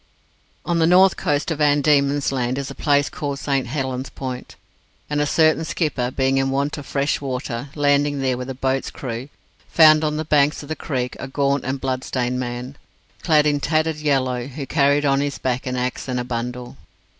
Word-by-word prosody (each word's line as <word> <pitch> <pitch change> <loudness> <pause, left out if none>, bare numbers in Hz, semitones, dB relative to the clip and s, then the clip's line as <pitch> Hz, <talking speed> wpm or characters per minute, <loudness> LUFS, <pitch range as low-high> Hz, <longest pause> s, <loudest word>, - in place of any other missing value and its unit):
On 170 -1 0
the 160 - +4
north 185 +2 +6
coast 145 +3 -1
of 155 - -3
Van 145 -1 +4
Diemen's 140 -1 +2
Land 125 -1 -1
is 140 -1 -4
a - - -6
place 145 -1 +2
called 140 -2 -4
St 135 -2 -1
Helen's 130 0 -3
Point, 130 -2 -7 0.6
and 150 0 +1
a 150 - +1
certain 155 +1 +3
skipper, 150 -7 -1
being 135 +1 +1
in 135 0 +1
want 140 +3 -1
of 140 - -10
fresh 140 +1 0
water; 130 -1 -4
landing 145 -1 +2
there 130 -2 0
with 125 +1 -6
a 135 - -4
boat's 135 +1 -1
crew, 125 +1 -6 0.4
found 155 -1 +6
on 150 0 0
the 155 - -3
banks 150 0 +2
of 145 - -12
the 160 - -2
creek 125 -6 -3
a - - -5
gaunt 140 0 0
and 130 +1 -2
blood 130 -1 -2
stained 125 0 -2
man, 125 +2 -5 0.4
clad 155 -3 +3
in 145 -1 +2
tattered 155 +1 0
yellow, 130 -4 0
who 140 +1 -6
carried 145 0 +2
on 135 -1 +3
his 145 -1 -2
back 130 0 -2
an 125 - -2
axe 125 +1 -3
and 125 -1 -1
a - - -2
bundle. 120 0 -5
140 Hz, 200 wpm, -21 LUFS, 130-150 Hz, 0.6 s, north